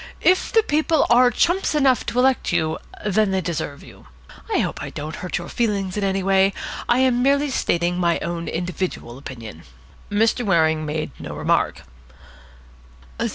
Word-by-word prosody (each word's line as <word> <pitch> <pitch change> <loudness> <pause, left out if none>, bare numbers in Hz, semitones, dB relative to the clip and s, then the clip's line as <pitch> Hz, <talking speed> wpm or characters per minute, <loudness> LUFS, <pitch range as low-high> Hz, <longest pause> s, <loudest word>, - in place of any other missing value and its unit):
If 370 +1 +3
the 450 -2 +4
People 310 -2 +2
are 245 +1 +6
chumps 345 - +1
enough 270 -4 +3
to 240 - -3
elect 260 +1 +2
you, 160 -2 0 0.3
then 210 0 +2
they 190 0 +1
deserve 160 -5 -4
you. 95 -9 -15 0.4
I - - +2
hope - - -1
I - - -5
don't 155 +2 -6
hurt 180 - -3
your 175 -1 -6
feelings 200 -5 -1
in 210 - -2
any 195 -1 0
way. 195 0 +3 0.4
I 240 - +4
am 250 -2 +3
merely 280 +2 +2
stating 175 -6 0
my 170 -1 +2
own 170 0 -4
individual 175 -7 -4
opinion." 115 - -9 0.5
Mr. 225 +4 +2
Waring 160 -6 +2
made 155 +1 -3
no - - -7
remark. - - 0
190 Hz, 160 wpm, -22 LUFS, 165-245 Hz, 0.5 s, are